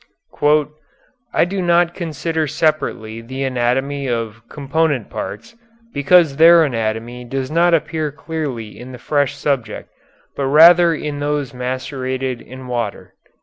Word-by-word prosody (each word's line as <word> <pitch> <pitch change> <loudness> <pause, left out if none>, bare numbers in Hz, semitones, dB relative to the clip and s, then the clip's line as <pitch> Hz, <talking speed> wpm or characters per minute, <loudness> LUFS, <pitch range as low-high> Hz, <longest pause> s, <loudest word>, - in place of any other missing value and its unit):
"I - - +3
do 190 +2 -3
not 175 0 +2
consider 160 -2 -3
separately 115 -7 -1
the 130 +4 -5
anatomy 135 +2 -1
of 115 -2 -3
component 145 -3 -1
parts, 230 +1 -6 0.4
because 145 0 +4
their 165 +1 +7
anatomy 115 -2 -3
does 130 +3 -4
not 170 +1 +4
appear 155 -1 -2
clearly 140 -8 -5
in 130 +1 -10
the - - -8
fresh 145 +2 0
subject, 125 -7 -3 0.4
but 140 - -2
rather 170 +4 +7
in 145 -1 -5
those 145 -2 -2
macerated 130 0 -3
in 130 +1 -11
water." 120 -4 -4
140 Hz, 125 wpm, -19 LUFS, 125-160 Hz, 0.4 s, their